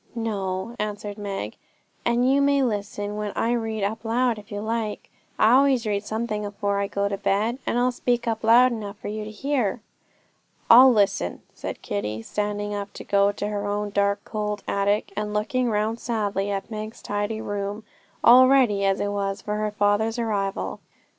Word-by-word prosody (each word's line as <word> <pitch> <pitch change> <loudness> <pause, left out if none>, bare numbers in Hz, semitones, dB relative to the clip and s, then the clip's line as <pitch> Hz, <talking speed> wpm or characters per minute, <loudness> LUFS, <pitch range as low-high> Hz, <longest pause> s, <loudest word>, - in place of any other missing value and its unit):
'No,' 205 -1 -3
answered 210 0 -4
Meg; 200 -1 -5 0.5
'and 240 +1 +2
you 275 +2 +4
may 280 -1 +3
listen 205 -2 -3
when 210 -1 -3
I 230 - +1
read 225 -3 -1
up 215 +3 -2
loud, 235 0 +1
if 205 - -16
you 205 - -3
like. 220 0 -3 0.3
I 220 - +5
always 265 -2 +4
read 205 -1 -1
something 215 0 -3
afore 200 0 -2
I 200 - 0
go 200 0 -1
to 200 -1 -3
bed, 215 +5 0
and - - +1
I'll 250 +1 +3
speak 245 -1 -1
up 225 -1 -1
loud 240 +3 +6
enough 210 -3 -5
for - - -6
you 215 +1 -4
to - - -7
hear.' 245 -1 -1 0.9
'I'll 255 +3 +10
listen,' 200 - +1
said - - -7
Kitty, 105 +2 -3
standing 205 - -2
up 200 0 -4
to - - -8
go 200 0 +3
to 205 - -3
her 205 -1 -3
own 205 0 -2
dark, 200 0 +1
cold 210 -1 -3
attic, 200 +1 0
and 210 0 -3
looking 245 +4 0
round 215 +2 0
sadly 205 -4 -1
at 200 +3 -4
Meg's 215 +1 -6
tidy 205 +1 -2
room, 205 0 -4 0.4
all 255 +2 +8
ready 245 -7 +4
as 195 0 +2
it 205 - -1
was 195 -1 -2
for 210 0 -2
her 215 0 0
father's 210 +2 +1
arrival. 205 -4 -2
210 Hz, 185 wpm, -24 LUFS, 200-230 Hz, 0.9 s, I'll